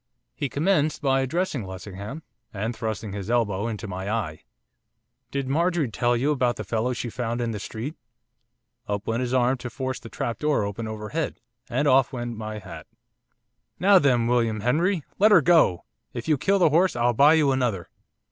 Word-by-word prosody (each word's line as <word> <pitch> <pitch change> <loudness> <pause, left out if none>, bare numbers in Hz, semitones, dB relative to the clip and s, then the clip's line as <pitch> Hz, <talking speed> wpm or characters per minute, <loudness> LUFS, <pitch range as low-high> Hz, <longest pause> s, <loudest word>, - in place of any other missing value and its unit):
He 140 - -3
commenced 155 0 +1
by 135 -1 +3
addressing 150 - -1
Lessingham, 100 - -8 0.3
and 110 +3 -3
thrusting 110 -2 -4
his 100 0 -5
elbow 115 -3 +1
into 110 -2 -5
my 95 +1 -5
eye. 95 -9 -3 0.9
'Did 140 -1 -3
Marjorie 165 -2 +1
tell 120 +2 +1
you 140 +5 +1
about 125 -4 +1
the - - -5
fellow 115 +2 -1
she 120 - -4
found 115 +2 -3
in 120 -1 -1
the 105 - -4
street?' 110 +8 -5 0.9
Up 105 0 -3
went 115 +2 -1
his 125 -1 -2
arm 130 0 +2
to 120 - -5
force 130 +1 -4
the 115 - -11
trap 115 - -4
door 150 -7 +1
open 100 +3 -4
overhead, 110 +9 -4 0.3
and 130 +4 0
off 135 -1 +4
went 120 -2 -4
my 110 0 -5
hat. 90 -6 -10 0.9
'Now 195 +3 +6
then, 125 -6 +3
William 115 -3 +1
Henry! 160 - +1 0.2
let 210 +2 +6
her 200 - +8
go! 155 - +3 0.3
if 120 +2 -6
you 155 - +4
kill 195 +8 +2
the 175 -4 +4
horse 175 +2 +3
I'll 120 0 +2
buy 145 +7 +6
you 150 -4 +3
another! 120 -9 -1
120 Hz, 185 wpm, -25 LUFS, 110-145 Hz, 0.9 s, her